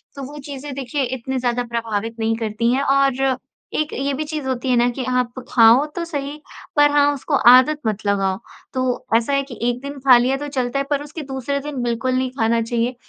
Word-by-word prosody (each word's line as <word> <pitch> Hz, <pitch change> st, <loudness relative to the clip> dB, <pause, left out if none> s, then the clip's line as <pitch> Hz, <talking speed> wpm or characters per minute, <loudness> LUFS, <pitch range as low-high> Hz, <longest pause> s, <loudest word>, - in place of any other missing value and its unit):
तो 275 Hz, -, -6 dB
वो 295 Hz, -, -10 dB
चीज़ें 280 Hz, 0 st, -6 dB
देखिए 275 Hz, +1 st, -2 dB
इतनी 260 Hz, +1 st, -3 dB
ज़्यादा 245 Hz, 0 st, 0 dB
प्रभावित 230 Hz, -2 st, -3 dB
नहीं 225 Hz, 0 st, +1 dB
करती 225 Hz, +1 st, 0 dB
हैं 270 Hz, +2 st, +1 dB
और 270 Hz, -1 st, +2 dB, 0.4 s
एक 310 Hz, 0 st, -1 dB
ये 275 Hz, +2 st, -1 dB
भी 285 Hz, +3 st, -2 dB
चीज़ 305 Hz, -2 st, -5 dB
होती 260 Hz, 0 st, -2 dB
है 250 Hz, -, +4 dB
ना 240 Hz, +1 st, +4 dB
कि 260 Hz, -, -2 dB, 0.2 s
आप 250 Hz, +1 st, -3 dB
खाओ 235 Hz, +4 st, +6 dB
तो 345 Hz, -, -2 dB
सही, 290 Hz, -2 st, -5 dB, 0.3 s
पर 290 Hz, 0 st, +5 dB
हाँ, 290 Hz, 0 st, +4 dB
उसको 280 Hz, -, -2 dB
आदत 255 Hz, +5 st, +6 dB
मत 215 Hz, 0 st, -2 dB
लगाओ। 195 Hz, -2 st, +1 dB, 0.4 s
तो 255 Hz, -1 st, -1 dB
ऐसा 235 Hz, +4 st, -1 dB
है 275 Hz, 0 st, +2 dB
कि 265 Hz, -3 st, -10 dB
1 245 Hz, 0 st, -2 dB
दिन 280 Hz, +1 st, -7 dB
खा 260 Hz, -2 st, +7 dB
लिया 255 Hz, +3 st, +1 dB
तो 290 Hz, +1 st, -5 dB
चलता 265 Hz, -1 st, -2 dB
है, 275 Hz, -, -1 dB
पर 290 Hz, -1 st, 0 dB
उसके 310 Hz, +2 st, -8 dB
दूसरे 270 Hz, 0 st, -3 dB
दिन 280 Hz, -2 st, -5 dB
बिल्कुल 240 Hz, +2 st, -1 dB
नहीं 260 Hz, 0 st, 0 dB
खाना 230 Hz, +1 st, +2 dB
चाहिए। 235 Hz, +2 st, -1 dB
260 Hz, 220 wpm, -20 LUFS, 235-280 Hz, 0.4 s, खा